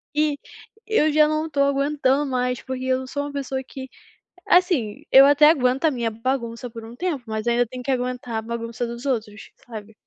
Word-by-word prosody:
e 300 -1 +1 0.5
eu 365 -9 +2
já 305 0 +5
não 310 +1 -1
tô 285 - -4
aguentando 280 0 +1
mais, 250 -1 -1
porque 260 0 -5
eu 260 0 -1
sou 285 +2 -3
uma 290 - -6
pessoa 270 -1 -3
que, 265 -1 -9 0.6
assim, 345 - +2
eu 270 +1 +9
até 290 +2 +6
aguento 260 -3 +2
a 315 - +4
minha 240 -4 -2
bagunça 235 +1 -3
por 225 -1 -10
um 230 - -11
tempo, 330 -2 -2
mas 220 +1 -4
ainda 240 0 +2
tem 250 +1 -8
que 270 - -1
aguentar 250 -3 -2
bagunça 235 +1 -4
dos 235 +3 -8
outros, 215 -5 -3 0.2
sabe. 220 -2 -9
255 Hz, 190 wpm, -23 LUFS, 235-285 Hz, 0.6 s, eu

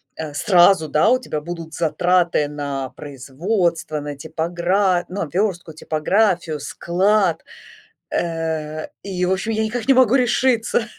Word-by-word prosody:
э, 155 -2 -6
сразу, 175 -1 +4
да, 150 +2 +3
у 255 - +4
тебя 155 -12 -5
будут 165 0 -7
затраты 175 -1 +1
на 140 -3 -4
производство, 155 - -2
на 145 0 -6
типогра 175 +4 0
ну, 200 +2 -4
о, - - -2
вёрстку, 180 -4 -1
типографию, 165 +1 0
склад. 185 +3 0 0.7
Э, 160 -2 -3
и, 180 -2 -2
в 185 - +1
общем, 195 +4 -1
я 220 0 0
никак 220 +1 -3
не 270 - +7
могу 255 -2 +4
решиться. 245 -2 +2
175 Hz, 135 wpm, -20 LUFS, 155-200 Hz, 0.7 s, не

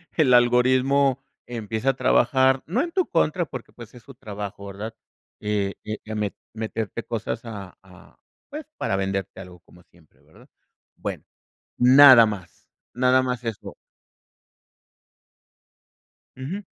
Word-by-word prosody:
el 145 -6 +3
algoritmo 130 +3 +3 0.2
empieza 110 +1 -3
a - - -12
trabajar, 130 0 +3
no 205 +11 0
en 340 - -5
tu 370 0 0
contra, 165 +1 +1
porque, 130 -5 -9
pues, 120 -3 -12
es 120 - -14
su 135 - -13
trabajo, 105 -4 -8
¿verdad? 105 +3 -7 0.5
Eh 105 -2 -1
eh, 110 0 -4
ya 110 0 -6
me 105 -2 -2 0.2
meterte 110 0 -4
cosas 115 0 -4
a 100 -5 -8
a, 90 -1 -19 0.3
pues, 300 +1 -7
para - - -1
venderte 95 -1 -3
algo 90 -1 -11
como 90 +1 -20
siempre, 85 -3 -27
¿verdad? - - -21 0.5
Bueno, - - -6 0.5
nada 130 -1 +8
más 100 -5 -7 0.3
nada 130 +1 +3
más 125 -1 -3
eso. 115 -2 -6 2.6
Ujú. 150 +11 -5
115 Hz, 135 wpm, -24 LUFS, 105-130 Hz, 2.6 s, nada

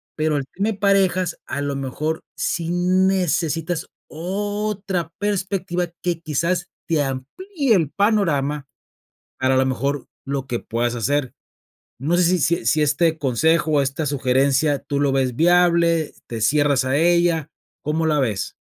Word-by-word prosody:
pero 155 -1 0
el 135 - -2
tema 205 +4 0
de - - 0
parejas, 190 -3 +2
a 140 +2 -3
lo 145 -1 -2
mejor, 145 +4 -3
sí 170 -1 -2
necesitas 175 -2 +1 0.2
otra 195 0 -3
perspectiva 190 -3 -1 0.2
que, 175 -2 -1
quizás, 170 +3 -1 0.2
te 160 -3 +2
amplíe 235 - -2
el 165 -6 +1
panorama 150 -9 +1 0.7
para, 130 0 +2
a 130 - +3
la 130 - +3
mejor 135 +2 -2 0.2
lo 135 -1 -3
que 120 -2 -2
puedas 120 +1 -1
hacer. 135 +3 0 0.7
No 155 +7 0
sé, 180 - +3
si 180 +2 +3
si 170 -3 +1
si 150 +6 +3
este 160 +2 +2
consejo, 155 +4 +2
o 145 -2 +4
esta 135 +4 -2
sugerencia 140 +2 +2
tú 140 +1 -3
lo 140 -1 +2
ves 130 -3 0
viable, 170 -1 +3
te 115 -1 -5
cierras 140 +2 +3
a 130 +2 +1
ella, 170 -1 +2 0.3
¿cómo 160 +2 0
la 150 -2 +2
ves? 105 -6 -1
160 Hz, 150 wpm, -21 LUFS, 140-175 Hz, 0.7 s, o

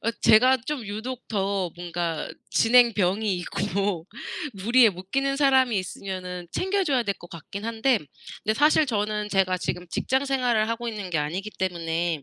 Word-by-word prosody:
어 230 - +1
제가 255 +4 +6
좀 290 -7 -3
유독 235 +5 -6
더 195 -3 -1
뭔가 170 -2 -3 0.2
진행병이 220 -4 +3
있고 180 0 -2 0.5
무리에 230 +5 +5
못 185 0 -11
끼는 275 +2 0
사람이 265 -5 +4
있으면은 185 -1 -6
챙겨 385 +1 0
줘야 270 -7 +2
될 200 -3 -2
것 175 - -13
같긴 185 +5 -8
한데 230 +2 +2 0.5
근데 215 - +1
사실 300 +4 +4
저는 210 -2 -1
제가 190 -2 +2
지금 180 0 -4
직장 265 +9 0
생활을 245 -5 +1
하고 230 +1 -3
있는 210 -4 -5
게 165 - 0
아니기 175 +8 -3
때문에 170 -3 -1
210 Hz, 315 characters per minute, -25 LUFS, 180-245 Hz, 0.5 s, 제가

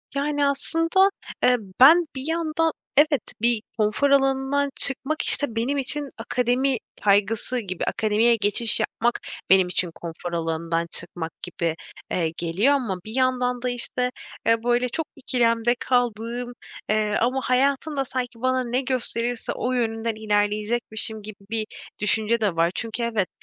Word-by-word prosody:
Yani, 290 +1 0
aslında, 330 +7 +2 0.3
eee, 250 - +5 0.2
ben 325 +6 +7
bir 265 - -4
yanda, 325 -1 0 0.3
evet, 295 -1 +4 0.2
bir 235 -1 +2 0.2
konfor 215 +6 +1
alanından 270 +1 +2
çıkmak, 280 +3 +2
işte, 285 -6 +5
benim 245 +5 -1
için 285 +2 +1
akademi 250 +3 0 0.3
kaygısı 210 +5 +2
gibi 185 -6 -5
akademiye 225 +1 +2
geçiş 220 +1 +2
yapmak 240 +1 -1 0.3
benim 190 -1 +5
için 180 -1 -2
konfor 170 +1 -7
alanından 165 0 -2
çıkmak 170 -1 -3
gibi, 170 -2 -2 0.4
eee, 165 -3 0
geliyor 180 +11 +2
ama 240 -9 -1
bir 220 +2 -6
yandan 250 -1 +1
da, 250 - -1
işte, 250 +1 -1 0.3
eee, 230 0 +2
böyle, 245 +1 +1
çok 320 +5 -3
ikilemde 240 -3 +1
kaldığım, 245 0 -1 0.4
eee, 215 0 +1
ama 250 +3 +1
hayatımda 275 +2 +1
sanki 245 -2 -5
bana 255 0 +1
ne 245 +2 -1
gösterirse 245 -2 -1
o 250 - -2
yönünden 225 -2 -1
ilerleyecekmişim 215 +1 -1
gibi 210 0 -10
bir 220 -1 -1 0.4
düşünce 220 +2 +1
de 200 -5 0
var. 165 +1 +2
Çünkü 225 +1 -3
evet, 220 -5 -1
240 Hz, 140 wpm, -24 LUFS, 215-265 Hz, 0.4 s, ben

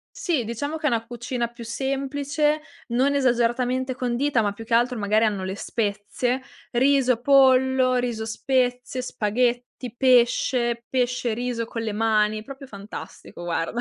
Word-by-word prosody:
Sì 320 -9 0
diciamo 285 +8 -3
che 315 - -6
è - - +4
una 230 -2 -1
cucina 240 +1 -3
più 235 0 -11
semplice, 280 +4 -1 0.3
non 255 +4 +2
esageratamente 250 0 +1
condita, 250 +1 0
ma 205 -2 0
più 225 +2 -10
che 230 - -4
altro 240 +2 +3
magari 215 +1 +2
hanno 205 -3 -1
le 190 +1 -3
spezie, 215 +5 -2 0.3
riso, 255 -1 +3
pollo, 260 -1 +4
riso-spezie, 245 +2 -1
spaghetti, 245 +1 -1
pesce, 240 -1 +2
pesce 250 -1 0
e - - -1
riso 240 -1 -2
con 230 0 -5
le 220 - -2
mani, 215 0 +1
proprio 275 +3 -10
fantastico 200 -4 -9
guarda. 175 +6 -2
245 Hz, 145 wpm, -24 LUFS, 225-260 Hz, 0.3 s, è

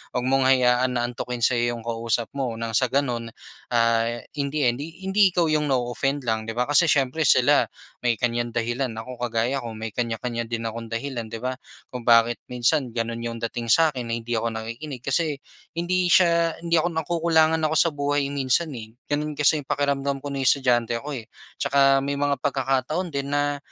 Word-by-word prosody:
Huwag 125 - 0
mong 135 0 +3
hayaan 125 -1 +3
na 120 - 0
antukin 120 0 -5
sa'yo 120 0 +2
'yong 115 - -9
kausap 115 0 -1
mo 130 -5 -2
nang 115 0 -4
sa 130 +4 +3
ganun 125 -4 -1 0.4
ah, 115 -1 +2 0.3
in 140 - 0
the 150 +2 -3
end 120 0 +2
hi 165 +5 -9
hindi 195 +1 +4
ikaw 175 -2 +1
'yong 150 -1 +1
na-o-offend 135 +2 -1
lang, 110 -1 -1
'di 115 - -4
ba? 125 - +2
Kasi 145 +4 +5
siyempre 140 +2 +1
sila - - +5 0.4
may 120 - +4
kanyang 120 0 -1
dahilan 120 +3 -1
ako 120 +2 -8
kagaya 120 +3 0
ko 115 -1 -6
may 110 +1 -4
kanya-kanya 115 0 -3
din 115 -1 -3
akong 115 +1 -4
dahilan, 115 +1 -4
'di 115 - -5
ba, 130 +1 -2 0.4
kung 125 - -4
bakit 115 0 +4
minsan 125 +3 +1
gano'n 115 0 -3
'yong 115 0 -4
dating 115 0 -5
sa 160 +5 +5
akin 125 -2 -5
na - - -1
hindi 115 +1 -5
ako 115 +1 0
nakikinig. 115 +5 -6
Kasi 150 +1 0 0.4
hindi 180 +1 +1
siya 170 -2 +4
hindi 170 0 -3
ako 175 - 0
nakukulangan 160 0 +2
ako 155 0 +1
sa 165 - +4
buhay 145 -1 0
minsan 140 +4 +1
eh. 110 -1 -10 0.2
Gano'n 150 +1 -1
kasi 150 +1 +3
'yung 135 - -20
pakiramdam 140 -1 0
ko 145 - -5
no'ng 135 - -2
estudyante 120 -3 +2
ako 140 0 -5
eh. - - -18 0.4
'Tsaka 135 -1 +4
may 140 - -1
mga 145 0 +1
pagkakataon 135 +5 -1
din 140 0 -2
na 145 0 +1
130 Hz, 195 wpm, -24 LUFS, 115-145 Hz, 0.4 s, Kasi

